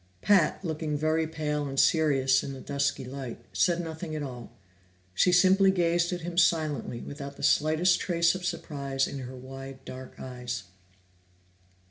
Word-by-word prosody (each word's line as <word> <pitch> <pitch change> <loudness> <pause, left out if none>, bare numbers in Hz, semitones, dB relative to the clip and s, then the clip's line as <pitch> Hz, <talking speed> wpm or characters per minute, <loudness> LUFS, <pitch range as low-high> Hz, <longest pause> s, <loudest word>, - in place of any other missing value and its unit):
Pat, 195 -2 +3
looking 155 -2 -2
very 155 +1 +1
pale 150 -2 -2
and 135 0 -2
serious 135 -5 +4
in 135 - -5
the 135 - -8
dusky 140 -1 -1
light, 130 -2 -6
said 175 -1 +2
nothing 160 -1 -5
at 150 - -3
all. 125 -4 -8 0.6
She 180 - +3
simply 190 +2 +5
gazed 175 -2 +2
at 175 -1 -3
him 175 +1 -1
silently, 155 -8 +1
without 140 -1 -8
the - - -9
slightest 160 +4 +3
trace 170 -2 +2
of 185 -1 -6
surprise 140 -6 -2
in 140 - -6
her 130 0 -7
wide 135 +1 -9
dark 130 0 -9
eyes. 125 -2 -5
150 Hz, 155 wpm, -28 LUFS, 135-170 Hz, 0.6 s, simply